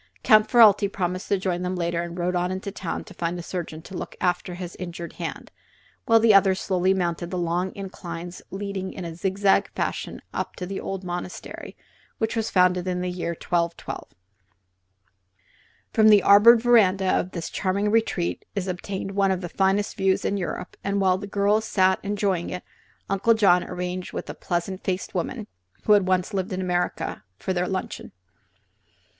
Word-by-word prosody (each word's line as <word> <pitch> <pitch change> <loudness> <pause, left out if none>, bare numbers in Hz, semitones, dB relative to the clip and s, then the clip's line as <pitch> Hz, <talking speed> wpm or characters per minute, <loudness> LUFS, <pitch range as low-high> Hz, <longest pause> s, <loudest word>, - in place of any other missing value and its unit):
Count 215 0 +5
Ferralti 210 -4 +6
promised 185 -1 -2
to 200 - +2
join 185 -2 -2
them 180 +1 -2
later 170 -1 -1
and 170 0 -6
rode 180 +1 -1
on 180 0 0
to 185 - -2
the 200 +1 -6
town - - -4
to 195 - -13
find 170 0 -2
a 175 - -6
surgeon 165 -3 -5
to 195 - -12
look - - -6
after 180 0 -1
his 180 -1 -7
injured 170 -1 -6
hand, - - -5 0.6
while 230 0 +6
the 225 -1 +5
others 195 -1 +5
slowly 185 -1 +1
mounted 175 -2 -1
the 180 - -3
long 175 +2 -1
inclines 175 -3 -7
leading 195 -1 -4
in 185 - -7
a 165 - -5
zigzag 195 +3 +2
fashion - - -3
up - - -3
to 180 - -5
the 195 +2 -4
old 195 -1 -5
monastery, 180 0 -6 0.4
which 220 0 -1
was 225 -1 -1
founded 180 -1 +3
in 180 -1 -1
the 180 0 -2
year 170 -1 -3
1212. 170 -1 -2 1.9
From 220 -1 +5
the 210 -2 +7
arbored 225 +3 +7
veranda 200 -6 +4
of 180 - 0
this 170 -3 -5
charming 200 +2 0
retreat 220 -6 0
is 195 -2 -2
obtained 190 +2 -4
one 195 0 +2
of 190 -1 0
the 175 - -5
finest 195 +3 +1
views 190 -1 +1
in 200 - +1
Europe, 180 -1 -4
and 200 0 0
while 185 -1 +3
the 205 - -6
girls 205 +2 +2
sat 190 -2 +3
enjoying 200 -3 -1
it 180 - -5 0.4
Uncle 200 +4 +3
John 180 -5 +4
arranged 180 0 -5
with - - -5
a - - -8
pleasant 180 +2 -3
faced 185 0 -2
woman 210 +5 -3 0.4
(who 210 - +5
had 200 -3 +4
once 185 +2 +1
lived 190 +1 -2
in 185 - -2
America) 180 - -2
for 190 - -2
their 180 0 0
luncheon. 190 -1 -4
185 Hz, 185 wpm, -25 LUFS, 180-200 Hz, 1.9 s, the